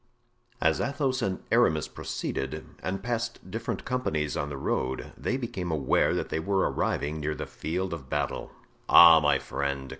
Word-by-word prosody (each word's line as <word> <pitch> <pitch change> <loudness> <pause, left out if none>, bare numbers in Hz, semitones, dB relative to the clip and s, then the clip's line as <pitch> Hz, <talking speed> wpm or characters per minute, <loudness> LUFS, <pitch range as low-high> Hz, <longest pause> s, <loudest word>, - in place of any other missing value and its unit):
As 80 -5 +2
Athos 135 -1 0
and 95 -4 -2
Aramis 95 - +3
proceeded, 70 +4 -4 0.2
and 95 +1 -3
passed 120 -1 -3
different - - -4
companies 80 -13 -1
on 70 - -2
the 70 - -5
road, 65 -1 -2
they 130 - -2
became 115 -9 -4
aware 75 -5 +2
that - - -2
they - - -1
were 95 +4 +1
arriving 75 +2 -1
near 75 0 -2
the - - -5
field 90 +3 -3
of 70 -6 -8
battle. - - -2 0.4
"Ah! 85 -1 +10
my 75 -2 +3
friend!" 70 -1 -3
80 Hz, 160 wpm, -28 LUFS, 75-110 Hz, 0.4 s, Ah